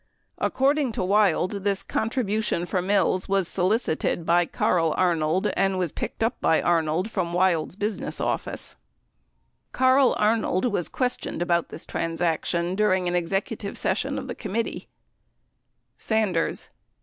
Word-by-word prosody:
According 275 -2 +1
to 190 - -2
Wild, 195 0 +2
this 200 -1 0
contribution 220 -5 -1
for 180 0 -1
Mills 190 -1 +1
was 195 -3 +2
solicited 180 -4 0
by 170 0 +3
Carl 165 -3 +1
Arnold 170 -1 +1
and 195 -1 +1
was 180 -4 -1
picked - - -4
up 230 +3 -1
by 160 - +3
Arnold 170 +4 0
from 175 -4 -2
Wild's 175 -2 +1
business 210 +1 -2
office. - - -1 1.0
Carl 260 0 +4
Arnold 215 -2 +1
was 205 -8 0
questioned 250 -8 -2
about 170 -1 0
this 160 - -7
transaction 170 +1 -1
during 190 -3 +1
an 175 - -1
execu 195 +5 -1
tive 200 -1 -6
session 265 +9 -1
of 265 - -5
the 245 - -4
committee: 230 +1 -4 1.1
Sanders. 210 -7 0
190 Hz, 135 wpm, -25 LUFS, 175-220 Hz, 1.1 s, Carl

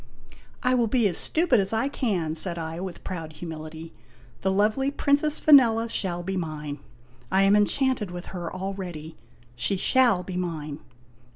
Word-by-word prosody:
" - - -25 0.2
I 250 -1 +3
will 240 -2 +2
be 230 -1 +2
as 180 - +1
stupid 315 -8 +3
as 195 -1 0
I 225 +4 +1
can," 190 - -1
said 170 +1 +1
I, 165 0 -5
with 185 -1 -7
proud 165 -4 -6
humility. 160 0 -8 0.5
"The 190 - +1
lovely 215 +8 +2
Princess 290 +1 +1
Vanella 230 -6 +5
shall 175 -2 -2
be 190 +2 -3
mine. 150 -4 -4 0.5
I 190 +1 +4
am 195 +1 +5
enchanted 225 +1 +1
with 175 0 -7
her 175 -2 -5
al 190 +1 -4
ready. 170 -5 -7 0.4
She 120 +12 -1
shall 235 -3 +3
be 180 -1 -6
mine." 155 -5 -4
190 Hz, 170 wpm, -25 LUFS, 165-230 Hz, 0.5 s, Vanella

